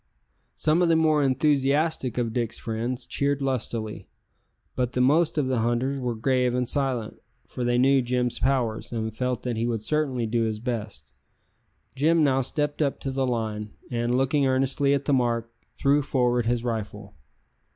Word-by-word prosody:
Some 155 +3 +2
of 175 - +3
the 165 - +4
more 155 -2 +3
enthusiastic 140 -1 +1
of 115 -2 -1
Dick's 120 -1 -1
friends 120 +3 -3
cheered 140 +2 0
lustily, 120 -5 -3 0.7
but 125 -1 -1
the - - -1
most 155 +6 +3
of 145 -3 +1
the 130 -2 0
hunters 120 +4 0
were 125 -2 -2
grave 125 +1 +1
and 125 -1 0
silent, 130 -5 -2 0.3
for 125 - -5
they 120 0 +1
knew 135 +2 +4
Jim's 125 0 -1
powers, 125 -5 0
and 110 -2 -3
felt 125 0 -2
that 120 -3 -2
he 115 +1 0
would 115 -3 -2
certainly 135 -4 0
do 115 +1 0
his 110 -1 -1
best. 105 - -5 0.8
Jim 160 +4 +3
now 135 -2 +3
stepped 145 +3 -2
up 140 -2 0
to 135 - -3
the 135 0 0
line, 110 -3 -3 0.2
and, 120 0 0
looking 135 +1 +2
earnestly 135 +2 +2
at 140 0 -3
the 145 - +2
mark, 115 -2 0 0.3
threw 140 +1 +3
forward 125 -4 +1
his 120 0 0
rifle. 105 -3 -4
125 Hz, 170 wpm, -25 LUFS, 115-140 Hz, 0.8 s, the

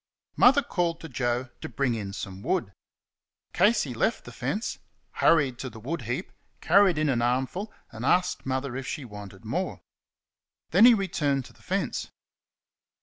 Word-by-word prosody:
Mother 275 +3 +6
called 170 -7 -1
to 165 - -8
Joe 125 0 -1
to - - -5
bring 135 -4 0
in 105 -4 -4
some 95 -1 -7
wood. 115 - -1 0.8
Casey 190 - +3
left 220 - 0
the - - -9
fence, 215 +3 -3 0.3
hurried 140 -7 +3
to 130 - -4
the 115 -1 -11
wood 145 +8 -4
heap, 120 - -3 0.3
carried 195 -5 +4
in 155 0 +1
an 125 -4 +1
armful, 130 - -1 0.2
and 110 - -8
asked 180 +6 +2
Mother 130 -1 -2
if 135 0 -5
she 145 - -4
wanted 105 -3 -10
more. - - -2 0.9
Then 195 +7 +7
he 245 -1 +9
returned 145 - 0
to - - -14
the - - -23
fence. - - -2
140 Hz, 160 wpm, -27 LUFS, 120-180 Hz, 0.9 s, he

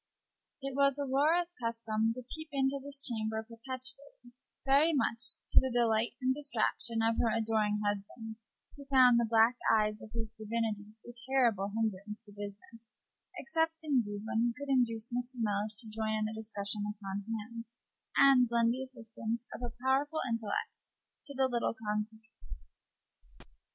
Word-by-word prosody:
It 275 0 -3
was 275 0 +3
Aurora's 300 +6 +2
custom 225 -1 0
to 255 - -7
peep 315 +5 -8
into 275 0 +1
this 280 0 -5
chamber 220 -4 -2
perpetually, 255 +2 -8 0.3
very 285 +5 +5
much 240 -3 0
to - - +8
the 260 - 0
delight 235 -2 +2
and 260 -1 +2
distraction 240 -4 0
of 230 - +1
her 230 - +3
adoring 215 -2 +1
husband, 205 +2 -3 0.4
who 280 -1 -11
found 255 -3 +6
the 235 - +1
black 230 +2 +5
eyes 215 -1 +2
of 215 - -10
his 225 -2 -3
divinity 215 -1 -3
a 240 - -8 0.2
terrible 230 -7 +3
hinderance 210 -1 -2
to 215 -3 -16
business, 205 +2 -10 0.4
except, 325 0 0
indeed, 225 -9 0
when 225 - 0
he 235 0 +2
could 285 -1 -6
induce 235 -2 +1
Mrs. 245 +1 -3
Mellish 210 -1 -1
to 220 +2 -9
join 215 0 -1
in 215 - 0
the 215 - -3
discussion 210 -1 -3
upon 205 -1 -4
hand, 230 +2 -7 0.5
and 265 -3 +7
lend 235 0 +3
the 260 - -4
assistance 230 -2 -5
of - - -7
her 240 -1 -3
powerful 290 +4 +2
intellect 230 -3 -3 0.4
to 280 - -8
the 265 0 +3
little 235 -2 0
conclave. 215 0 -3
230 Hz, 155 wpm, -32 LUFS, 215-260 Hz, 0.5 s, to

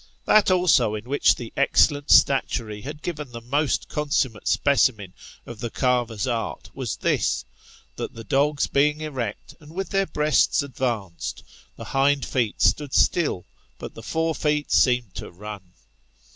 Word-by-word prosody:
That 215 -2 +5
also 155 - +3
in 105 - -6
which 145 +2 +3
the 120 -2 -9
excellent 145 +1 +2
statuary 115 -6 +3
had 150 +5 -8
given 150 -6 -5
the 120 - -7
most 140 +5 -1
consummate 145 -6 -1
specimen 115 -9 +2 0.3
of 120 -2 -10
the 120 - -4
carver's 120 -5 0
art 115 -3 -4
was - - -4
this, - - 0 0.5
that - - -5
the 115 - -8
dogs 145 +4 +1
being 150 +2 +1
erect, 130 -9 -5
and 155 0 -15
with 195 +1 -3
their 195 -1 +1
breasts 150 -1 +2
ad 140 -2 -10
vanced, 115 -9 -3 0.3
the - - -9
hind 140 +1 +1
feet 120 -5 -1
stood 145 -3 +2
still, 155 - +2 0.3
but - - -8
the - - -10
fore 160 0 -1
feet 150 -1 -1
seemed 125 -5 +3
to - - -7
run. 100 0 -10
135 Hz, 155 wpm, -24 LUFS, 115-150 Hz, 0.5 s, That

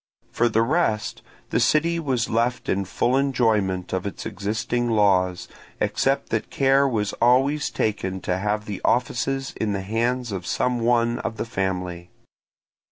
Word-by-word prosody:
For 120 0 +2
the 115 0 +2
rest, 115 -6 0 0.3
the - - +2
city 170 +2 +2
was 130 -7 0
left 120 +2 0
in 100 0 0
full 120 +7 0
enjoyment 110 -10 +1
of 95 +2 -1
its 100 - -7
existing 110 +3 -2
laws, 95 -5 +2 0.3
except - - 0
that - - -2
care 135 +1 +3
was 105 -5 -1
always 135 +5 +3
taken 95 -3 -2
to 90 +1 -1
have 105 +1 -1
the 100 -3 -5
offices 135 +2 0
in 105 -2 0
the 100 - -2
hands 120 +3 -1
of 95 -2 -5
some 125 -1 0
one 120 0 +2
of 115 -1 -4
the - - -2
family. 90 -4 -3
115 Hz, 155 wpm, -24 LUFS, 100-125 Hz, 0.3 s, care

